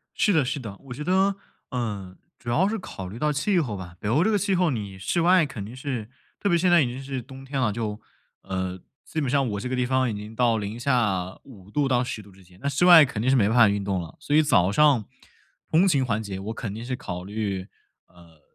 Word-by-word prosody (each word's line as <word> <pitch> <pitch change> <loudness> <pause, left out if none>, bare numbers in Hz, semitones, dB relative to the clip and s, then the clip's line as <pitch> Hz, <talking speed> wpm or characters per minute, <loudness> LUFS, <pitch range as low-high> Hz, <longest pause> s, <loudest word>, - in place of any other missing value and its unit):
是 210 - +3
的 160 -6 +3
是 130 - -2
的， 110 -7 -7
我 130 -2 -8
觉 150 - -6
得， 190 +3 +2 0.3
呃， 105 -7 -4 0.2
主 120 - -6
要 185 +11 +3
是 225 - -2
考 95 - -7
虑 105 +6 -8
到 150 +1 +1
气 180 +7 +1
候 120 -10 -3
吧。 90 -2 -9
北 105 - -3
欧 145 - +3
这 - - +2
个 210 - +2
气 195 +1 0
候， 180 -2 +2
你 100 -7 -5
室 95 - -1
外 180 +1 +5
肯 120 -8 -7
定 110 +5 -9
是 130 -5 -4 0.3
特 205 - +1
别 170 - +3
现 180 +2 +2
在 175 -2 +6
已 - - +1
经 125 +2 -6
是 135 -2 -4
冬 135 +3 -12
天 135 0 -3
了， 110 -5 +1
就 105 -1 -4 0.4
呃， 95 -1 -3 0.3
基 160 - -3
本 140 - -1
上 135 +1 +2
我 100 -1 -3
这 125 - -4
个 130 - -2
地 125 -1 +1
方 130 -1 +1
已 - - -3
经 105 +2 -8
到 115 -1 +2
零 105 +2 -5
下 110 -8 0
5°C-10°C 120 -1 -2
之 95 0 -19
间， 90 +1 -20
那 140 - 0
室 140 +5 +1
外 175 -4 +10
肯 125 -6 -4
定 125 +4 +2
是 135 - +4
没 105 -5 +3
办 115 - +1
法 110 -3 +7
运 100 0 -1
动 95 -2 -1
了， 80 -3 -11
所 145 - -2
以， 155 - +6
早 95 - +3
上 140 -3 +4 0.7
通 170 +5 +4
勤 140 -8 +3
环 110 -3 -1
节 100 -3 -5
我 105 +4 -5
肯 110 -4 -5
定 115 - -7
是 130 +1 -3
考 90 -9 -6
虑， 100 -2 -3 0.7
呃 75 - -30
120 Hz, 275 characters per minute, -25 LUFS, 100-145 Hz, 0.7 s, 外